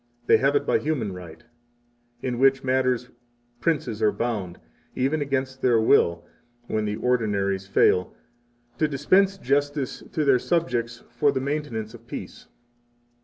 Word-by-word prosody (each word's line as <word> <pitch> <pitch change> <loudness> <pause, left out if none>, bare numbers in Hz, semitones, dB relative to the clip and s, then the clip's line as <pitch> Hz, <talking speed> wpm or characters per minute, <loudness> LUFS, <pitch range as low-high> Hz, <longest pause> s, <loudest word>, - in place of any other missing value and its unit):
they - - +6
have 140 +2 +2
it 145 0 +1
by - - +2
human 130 -10 -2
right, 85 0 -11 0.8
in 125 -2 -2
which 135 0 +4
matters 130 -2 0 0.5
princes 120 -7 -1
are 110 - +4
bound, 105 -7 -3 0.4
even 140 +4 0
against 130 -2 -2
their 120 -3 +4
will, 85 -6 +3 0.4
when 110 -2 -1
the 105 0 -2
ordinaries 100 -5 0
fail, 90 -1 +3 0.7
to 155 - +3
dispense 185 +8 +2
justice 145 -2 -1
to 155 - -1
their 135 -3 +4
subjects 120 -8 -1
for 120 - +2
the - - -1
maintenance 135 -6 -3
of 115 0 -14
peace. - - -8
125 Hz, 140 wpm, -25 LUFS, 110-140 Hz, 0.8 s, they